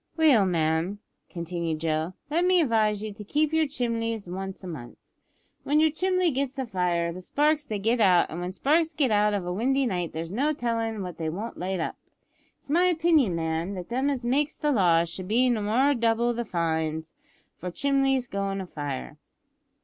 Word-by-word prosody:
"Well, 275 Hz, -11 st, +5 dB
ma'am," 165 Hz, +2 st, 0 dB, 0.3 s
continued 170 Hz, -2 st, -3 dB
Joe, 160 Hz, +2 st, -1 dB, 0.2 s
"let 335 Hz, +3 st, +2 dB
me 365 Hz, 0 st, +4 dB
advise 215 Hz, -7 st, +2 dB
you 215 Hz, -1 st, -5 dB
to 210 Hz, +1 st, -9 dB
sweep 300 Hz, +8 st, 0 dB
yer 320 Hz, -1 st, +3 dB
chimleys 230 Hz, -6 st, -2 dB
once 190 Hz, +2 st, -6 dB
a -, -, -6 dB
month. 145 Hz, -9 st, -8 dB, 0.7 s
When 295 Hz, +2 st, +2 dB
your 315 Hz, 0 st, +4 dB
chimley 365 Hz, +1 st, +1 dB
gets 275 Hz, +1 st, -2 dB
afire 180 Hz, -8 st, -1 dB
the 185 Hz, -, -8 dB
sparks 295 Hz, +8 st, +1 dB
they 215 Hz, -, -2 dB
get 225 Hz, +4 st, +1 dB
out, 180 Hz, -4 st, +4 dB
and 170 Hz, +3 st, -5 dB
when 180 Hz, +1 st, -3 dB
sparks 315 Hz, -, +1 dB
get 275 Hz, -6 st, +2 dB
out 210 Hz, 0 st, +3 dB
of 195 Hz, -3 st, -3 dB
a 180 Hz, -, -2 dB
windy 265 Hz, +7 st, +1 dB
night 180 Hz, -7 st, -2 dB
there's 165 Hz, +1 st, -5 dB
no 280 Hz, +9 st, +1 dB
tellin' 230 Hz, -5 st, -2 dB
what 180 Hz, -3 st, -7 dB
they 160 Hz, -1 st, -1 dB
won't 205 Hz, +8 st, -6 dB
light 185 Hz, +1 st, -2 dB
up. -, -, -3 dB, 0.6 s
It's -, -, -24 dB
my 340 Hz, +5 st, +3 dB
opinion, 320 Hz, -, +3 dB
ma'am, 165 Hz, +3 st, -2 dB
that 180 Hz, +1 st, -7 dB
them 260 Hz, +4 st, 0 dB
as 260 Hz, -4 st, -2 dB
makes 285 Hz, +5 st, +1 dB
the 300 Hz, -1 st, 0 dB
laws 170 Hz, -8 st, +3 dB
should 185 Hz, +3 st, -7 dB
more 250 Hz, +3 st, +3 dB
nor 250 Hz, +8 st, +3 dB
double 235 Hz, -1 st, +1 dB
the 240 Hz, 0 st, -3 dB
fines 160 Hz, -3 st, -2 dB, 0.5 s
for 180 Hz, -, -4 dB
chimleys 270 Hz, +3 st, +1 dB
goin' 195 Hz, -2 st, -2 dB
afire. 145 Hz, -, -5 dB
215 Hz, 190 wpm, -26 LUFS, 175-275 Hz, 0.7 s, Well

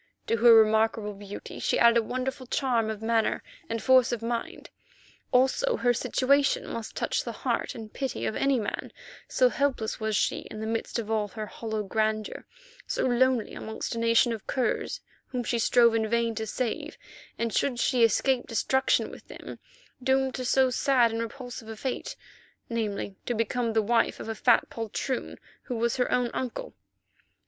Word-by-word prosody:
To 230 Hz, -, +1 dB
her 235 Hz, +2 st, +7 dB
remarkable 220 Hz, -1 st, +3 dB
beauty 200 Hz, 0 st, -9 dB
she -, -, +1 dB
added 235 Hz, 0 st, +6 dB
a -, -, +4 dB
wonderful 255 Hz, +2 st, -4 dB
charm 240 Hz, -4 st, +1 dB
of 220 Hz, 0 st, -5 dB
manner 225 Hz, 0 st, +1 dB, 0.3 s
and 230 Hz, -1 st, -3 dB
force 260 Hz, -2 st, +5 dB
of 235 Hz, -2 st, -3 dB
mind. 235 Hz, 0 st, -4 dB, 0.6 s
Also 265 Hz, -, +3 dB
her 245 Hz, -1 st, +2 dB
situation 275 Hz, +4 st, +2 dB
must 230 Hz, -1 st, -6 dB
touch -, -, -1 dB
the -, -, -4 dB
heart -, -, -1 dB
and 220 Hz, -2 st, -9 dB
pity 270 Hz, -3 st, -3 dB
of 215 Hz, -, -2 dB
any 275 Hz, -2 st, +2 dB
man, 210 Hz, -, -4 dB, 0.4 s
so -, -, +3 dB
helpless 275 Hz, -, -1 dB
was 220 Hz, -1 st, -1 dB
she -, -, +1 dB
in 215 Hz, -, -8 dB
the 220 Hz, -, -4 dB
midst 225 Hz, +2 st, -2 dB
of 225 Hz, -2 st, -4 dB
all 215 Hz, -2 st, +1 dB
her 215 Hz, +2 st, -6 dB
hollow 220 Hz, 0 st, -4 dB
grandeur, 215 Hz, +1 st, -2 dB, 0.4 s
so -, -, -1 dB
lonely 255 Hz, -2 st, +2 dB
amongst 220 Hz, +2 st, -5 dB
a 230 Hz, -, -3 dB
nation 230 Hz, +1 st, +3 dB
of 220 Hz, -, -8 dB
curs 255 Hz, -2 st, -1 dB, 0.3 s
whom 250 Hz, -1 st, -3 dB
she 235 Hz, 0 st, -1 dB
strove 235 Hz, 0 st, +5 dB
in 220 Hz, -1 st, 0 dB
vain 235 Hz, 0 st, +1 dB
to 220 Hz, 0 st, -4 dB
save, 240 Hz, +1 st, -3 dB, 0.4 s
and 230 Hz, -1 st, -2 dB
should 250 Hz, -4 st, 0 dB
she 250 Hz, -1 st, +3 dB
escape 245 Hz, +3 st, +2 dB
destruction 265 Hz, +3 st, +1 dB
with -, -, -13 dB
them, -, -, -9 dB, 0.4 s
doomed 265 Hz, 0 st, +2 dB
to 255 Hz, -, -4 dB
so 260 Hz, +1 st, +3 dB
sad 250 Hz, -3 st, +3 dB
and 225 Hz, 0 st, -2 dB
repulsive 240 Hz, -1 st, -7 dB
a 225 Hz, -, -6 dB
fate, 255 Hz, +4 st, -4 dB, 0.6 s
namely 205 Hz, -4 st, -3 dB
to 240 Hz, -, 0 dB
become 230 Hz, +1 st, 0 dB
the 220 Hz, -1 st, +2 dB
wife 230 Hz, +2 st, +1 dB
of -, -, -7 dB
a 225 Hz, -, -2 dB
fat 235 Hz, +2 st, +3 dB
poltroon 230 Hz, +3 st, -3 dB, 0.3 s
who 250 Hz, -, -4 dB
was 235 Hz, +2 st, 0 dB
her 250 Hz, -, 0 dB
own 250 Hz, -1 st, +1 dB
uncle. 260 Hz, -, -4 dB
230 Hz, 180 wpm, -27 LUFS, 220-255 Hz, 0.6 s, her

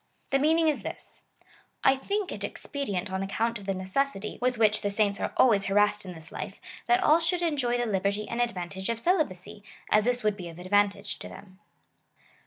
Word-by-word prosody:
The 275 Hz, -, +3 dB
mean 310 Hz, +3 st, +4 dB
ing 330 Hz, -1 st, +3 dB
is 305 Hz, -, +1 dB
this: -, -, -9 dB, 0.3 s
" -, -, -31 dB
I 270 Hz, -, +6 dB
think 400 Hz, +8 st, -2 dB
it -, -, -5 dB
expedient 205 Hz, -10 st, -3 dB
on 190 Hz, 0 st, -2 dB
account 225 Hz, +4 st, -1 dB
of 200 Hz, -, -12 dB
the 195 Hz, -, +1 dB
neces 190 Hz, +9 st, 0 dB
sity, 215 Hz, +3 st, -7 dB
with 250 Hz, 0 st, +1 dB
which 215 Hz, -1 st, +3 dB
the 205 Hz, -, 0 dB
saints 200 Hz, -1 st, +1 dB
are -, -, -2 dB
always 205 Hz, -6 st, +5 dB
harassed 205 Hz, +1 st, +2 dB
in 180 Hz, -, -6 dB
this 160 Hz, 0 st, -10 dB
life, -, -, -6 dB, 0.3 s
that 365 Hz, +1 st, +4 dB
all 310 Hz, +2 st, +6 dB
should 345 Hz, +1 st, 0 dB
enjoy 275 Hz, -7 st, +1 dB
the 240 Hz, -, 0 dB
liberty 200 Hz, 0 st, 0 dB
and 235 Hz, +1 st, -2 dB
advantage 190 Hz, -4 st, -3 dB
of 230 Hz, -, 0 dB
celibacy, 215 Hz, -, -1 dB, 0.3 s
as 215 Hz, 0 st, +4 dB
this 245 Hz, -1 st, +1 dB
would 210 Hz, -1 st, +2 dB
be 175 Hz, -3 st, -7 dB
of 165 Hz, -, -11 dB
advantage 200 Hz, +2 st, +1 dB
to -, -, -7 dB
them." 190 Hz, -1 st, -13 dB
210 Hz, 210 wpm, -28 LUFS, 195-270 Hz, 0.3 s, I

